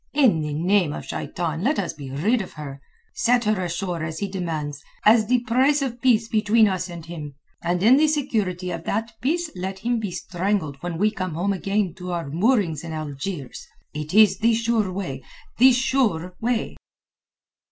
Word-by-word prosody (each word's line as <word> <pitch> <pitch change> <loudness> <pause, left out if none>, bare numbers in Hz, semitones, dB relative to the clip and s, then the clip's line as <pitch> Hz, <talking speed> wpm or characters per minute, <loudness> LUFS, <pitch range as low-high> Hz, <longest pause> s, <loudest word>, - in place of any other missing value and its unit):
In 255 - +4
the 150 -1 -3
name 175 -1 +2
of - - -6
Shaitan, 165 -2 -3
let 275 +9 +1
us 180 -5 -1
be 140 -3 -9
rid 200 - +1
of 190 - -8
her; 140 -3 -8 0.3
set 240 0 +2
her 210 -3 +1
ashore 175 -1 -3
as 160 0 -4
he 200 - -2
demands, 160 -6 -4 0.2
as 215 0 +6
the 250 0 +3
price 265 +4 +2
of 245 -3 -4
peace 230 -3 +3
between 215 0 +4
us 185 -1 -2
and 170 -2 -8
him, 155 -4 -7 0.3
and 175 +2 0
in 245 +5 +7
the 310 +1 +4
security 210 - -1
of 165 -1 -5
that 225 +3 -1
peace 320 +6 0
let 190 +1 -4
him 235 +4 -1
be 210 -3 -3
strangled 180 -3 -2
when 175 -1 -4
we 210 +4 +2
come 185 -6 -4 0.2
again 195 -1 -1
to 180 -1 -5
our 170 -3 -3
moorings 180 - +1
in 165 -1 -6
Algiers. 150 -1 -5 0.3
It 150 +1 -5
is 210 -3 +6
the 230 0 +3
sure 225 -4 +1
way—the 190 - 0
sure 240 -9 +1
way!" 235 0 -1
190 Hz, 180 wpm, -23 LUFS, 165-230 Hz, 0.3 s, in